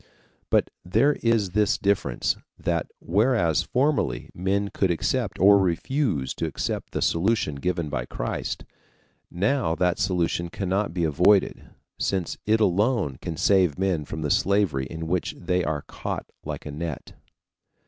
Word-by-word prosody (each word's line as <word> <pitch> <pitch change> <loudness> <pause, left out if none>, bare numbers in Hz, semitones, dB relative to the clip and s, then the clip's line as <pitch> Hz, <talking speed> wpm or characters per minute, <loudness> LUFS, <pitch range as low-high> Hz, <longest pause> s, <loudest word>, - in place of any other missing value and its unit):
But - - +2
there 115 +11 +3
is 115 -5 +2
this 105 +2 +2
difference, 100 0 0 0.2
that - - -1
whereas 95 - +2
formerly 130 - 0
men 100 +3 0
could 95 - 0
accept 85 - -1
or 100 +2 +6
refuse 90 - 0
to - - -2
accept - - -3
the - - 0
solution 95 -1 +1
given 85 +3 -2
by - - -3
Christ, - - -4 0.6
now 100 -1 0
that 90 0 +1
solution 85 -2 0
cannot 95 +2 -1
be 85 0 -2
avoided, 90 +6 +3 0.3
since 95 -3 -1
it 110 +1 +4
alone 105 - +1
can 80 - -5
save 95 -7 +3
men 95 -5 0
from 80 +2 -6
the 75 - 0
slavery 95 -10 +2
in 80 +3 -6
which 90 +2 -1
they 90 0 0
are 75 -3 -2
caught - - -5 0.2
like - - -6
a 75 - -5
net. 80 0 -5
90 Hz, 145 wpm, -25 LUFS, 80-100 Hz, 0.6 s, or